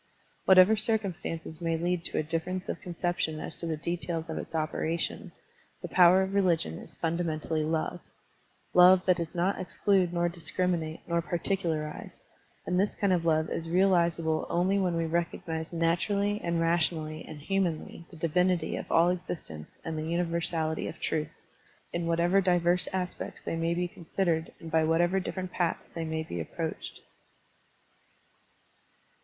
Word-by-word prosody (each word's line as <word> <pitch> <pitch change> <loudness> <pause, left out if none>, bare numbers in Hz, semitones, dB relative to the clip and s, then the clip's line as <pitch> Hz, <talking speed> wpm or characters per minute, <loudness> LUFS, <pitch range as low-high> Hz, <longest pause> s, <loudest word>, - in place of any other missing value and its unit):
Whatever 190 +3 +7
circumstances 195 -7 -2
may 165 -1 0
lead 175 +1 -1
to - - -3
a - - +2
difference 165 +4 -3
of - - -4
conception 175 -3 -2
as - - -1
to 170 - -4
the 160 -1 -1
details 165 0 -3
of - - -3
its - - -7
operation, 160 +1 -2 0.5
the - - -3
power 185 +1 +6
of 190 +1 -4
religion 170 - +1
is - - -10
fundamentally 160 -2 -1
love, 160 +1 -1 0.4
— - - -39
^love 180 +1 +7
that 185 -1 +4
does 170 0 -4
not 180 +3 +1
exclude 185 -1 +1
nor 175 0 +1
discrimi 175 +1 -1
nate 160 0 -6
nor 170 0 +1
particularize; 170 -3 -3 0.4
and 180 0 +1
this 200 +2 +1
kind 200 -2 +2
of 170 -2 0
love 155 -1 +2
is 165 0 -3
realizable 170 -3 +2
only 185 +3 +2
when 180 -3 +1
we 165 - 0
recognize 165 -1 -2
naturally 200 +5 +1
and 170 -1 0
rationally 160 -2 0
and 155 - -8
humanly 175 -2 -2
the 170 - -12
divinity 170 +1 +1
of - - -7
all 170 +1 +5
exist 180 - -4
ence 75 -1 -8 0.2
and 160 -1 -3
the - - -3
universality 165 -2 -1
of 155 - -8
truth, 155 -1 -1 0.6
in 170 -1 -1
whatever 170 +3 +3
divers 180 -1 +3
aspects 185 -1 -4
they - - -2
may 165 +1 0
be 180 +1 0
considered 170 -1 -2
and 165 - -9
by 160 0 +3
whatever 175 +4 +2
different 185 -1 -4
paths 175 -2 -2
they 165 - -3
may 160 0 -2
be 85 - -5
approached. 80 - -5
170 Hz, 160 wpm, -29 LUFS, 160-180 Hz, 0.6 s, Whatever